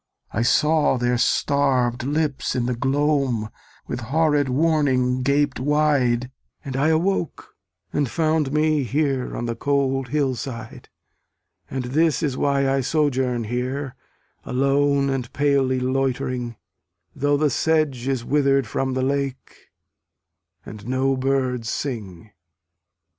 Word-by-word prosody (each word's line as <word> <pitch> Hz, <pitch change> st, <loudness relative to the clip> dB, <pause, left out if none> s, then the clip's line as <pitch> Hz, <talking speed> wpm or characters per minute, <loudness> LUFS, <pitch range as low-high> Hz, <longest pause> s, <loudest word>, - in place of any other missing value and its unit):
I 110 Hz, -, -1 dB
saw 150 Hz, +3 st, +3 dB
their 120 Hz, 0 st, 0 dB
starv'd 130 Hz, -3 st, +1 dB
lips 145 Hz, 0 st, -1 dB
in 125 Hz, -2 st, 0 dB
the 125 Hz, -, 0 dB
gloam 135 Hz, -4 st, 0 dB, 0.3 s
With -, -, -4 dB
horrid 145 Hz, +2 st, +1 dB
warning 130 Hz, -3 st, +2 dB
gaped 140 Hz, +1 st, +1 dB
wide, 130 Hz, -4 st, +1 dB, 0.3 s
And 135 Hz, -2 st, -5 dB
I 140 Hz, +3 st, +2 dB
awoke, 165 Hz, +2 st, -1 dB, 0.4 s
and 145 Hz, -4 st, 0 dB
found 155 Hz, +1 st, 0 dB
me 155 Hz, 0 st, +2 dB
here 135 Hz, 0 st, -1 dB
On 120 Hz, -, -3 dB
the 115 Hz, 0 st, -3 dB
cold 135 Hz, 0 st, 0 dB
hill 140 Hz, 0 st, 0 dB
side. 115 Hz, -2 st, -7 dB, 0.8 s
And 130 Hz, -1 st, -3 dB
this 155 Hz, +5 st, +1 dB
is 140 Hz, -4 st, 0 dB
why 140 Hz, 0 st, +1 dB
I 135 Hz, 0 st, +1 dB
sojourn 130 Hz, -4 st, 0 dB
here 125 Hz, +4 st, -3 dB, 0.5 s
Alone 140 Hz, +1 st, +1 dB
and 130 Hz, -3 st, -3 dB
palely 140 Hz, -2 st, +2 dB
loitering, 125 Hz, -2 st, -1 dB, 0.6 s
Though 145 Hz, +1 st, +1 dB
the 150 Hz, -1 st, +2 dB
sedge 150 Hz, -6 st, 0 dB
is 130 Hz, -3 st, -1 dB
wither'd 140 Hz, -2 st, +2 dB
from 130 Hz, +4 st, -2 dB
the 130 Hz, -, 0 dB
lake, 135 Hz, -1 st, -3 dB, 1.0 s
And 105 Hz, 0 st, -10 dB
no 130 Hz, +1 st, +1 dB
birds 130 Hz, -3 st, -1 dB
sing. 110 Hz, -, -5 dB
135 Hz, 125 wpm, -22 LUFS, 125-145 Hz, 1.0 s, saw